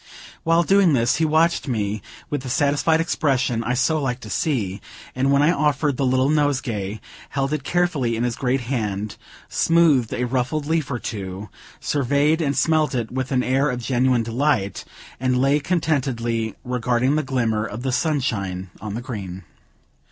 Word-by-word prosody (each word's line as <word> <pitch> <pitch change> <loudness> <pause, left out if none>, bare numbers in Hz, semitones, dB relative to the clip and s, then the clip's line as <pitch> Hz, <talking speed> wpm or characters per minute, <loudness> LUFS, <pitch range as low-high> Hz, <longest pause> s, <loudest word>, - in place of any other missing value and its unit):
While 165 +1 +3
doing 195 -2 +4
this, 120 -2 +2
he 160 - +2
watched 160 +1 +2
me 105 -4 -1 0.3
with 145 -2 -3
the 130 - -6
satisfied 145 +4 +2
expression 135 -7 0
I 125 +2 0
so 155 +5 +1
liked 125 -2 -2
to 105 - -8
see; 105 - -1 0.3
and 135 +2 +1
when 140 +1 +4
I 155 - +5
offered 145 -3 +1
the 135 - +1
little 130 +1 +2
nosegay, 125 -9 0 0.3
held 135 +1 -1
it 150 -3 -2
carefully 155 -9 0
in 115 - -1
his 120 -1 -1
great 130 0 0
hand, 105 -5 -3 0.3
smoothed 160 -8 +3
a 125 - -1
ruffled 130 +4 -1
leaf 160 -2 0
or 125 - -2
two, 100 -3 -6 0.3
surveyed 145 +3 +1
and 140 -3 0
smelt 155 -3 +2
it 115 -3 -2
with 130 +1 -3
an 125 -1 +2
air 135 +3 +2
of 125 -2 -2
genuine 125 0 +1
delight, 115 -4 0 0.3
and 130 0 +1
lay 135 +3 +3
contentedly 130 - -1
regarding 125 +2 +1
the 155 - +2
glimmer 115 -6 0
of 110 +2 -6
the 135 - 0
sunshine 110 - -1
on 105 -1 -5
the 120 - -4
green. 100 -7 -6
130 Hz, 170 wpm, -22 LUFS, 115-150 Hz, 0.3 s, I